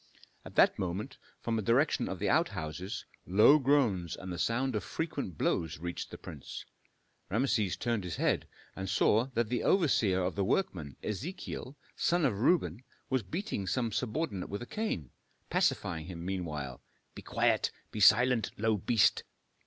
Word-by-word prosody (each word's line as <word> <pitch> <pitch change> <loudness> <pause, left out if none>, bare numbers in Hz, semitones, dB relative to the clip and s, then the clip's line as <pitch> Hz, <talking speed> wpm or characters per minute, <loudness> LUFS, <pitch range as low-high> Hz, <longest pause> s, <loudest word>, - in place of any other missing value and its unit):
At - - -11
that - - +5
moment, 95 +8 -3 0.2
from 115 -1 -1
the - - 0
direction 120 +8 +2
of 95 - -3
the 100 - -1
outhouses, 95 - -1 0.2
low 105 +11 +7
groans 120 - +2
and 95 -1 -6
the 85 - -5
sound 130 +2 0
of 105 - -1
frequent 140 - -4
blows 80 0 0
reached 85 +3 -5
the - - -8
prince. 70 - -8 0.6
Rameses 110 -2 +1
turned 115 -4 -1
his 90 -1 -4
head, - - +1 0.3
and 95 0 -4
saw 110 +3 +3
that 115 -1 +1
the 120 -1 0
overseer 110 - +3
of 90 - -1
the 100 - 0
workmen, 90 - -1
Ezechiel, 135 - -5 0.2
son 175 -2 +2
of 105 -7 0
Reuben, 115 - +2 0.3
was 130 -1 +2
beating 105 - -4
some 115 +3 0
subordinate 110 - -2
with 100 +4 -4
a - - -7
cane, 120 - -3 0.4
pacifying 80 -2 0
him 85 -2 -7
meanwhile, 75 -9 -4 0.3
"Be - - -9
quiet! - - +1 0.2
be 110 - -5
silent, 115 +3 +5
low 110 0 +2
beast!" 110 +3 +3
105 Hz, 160 wpm, -31 LUFS, 90-130 Hz, 0.6 s, low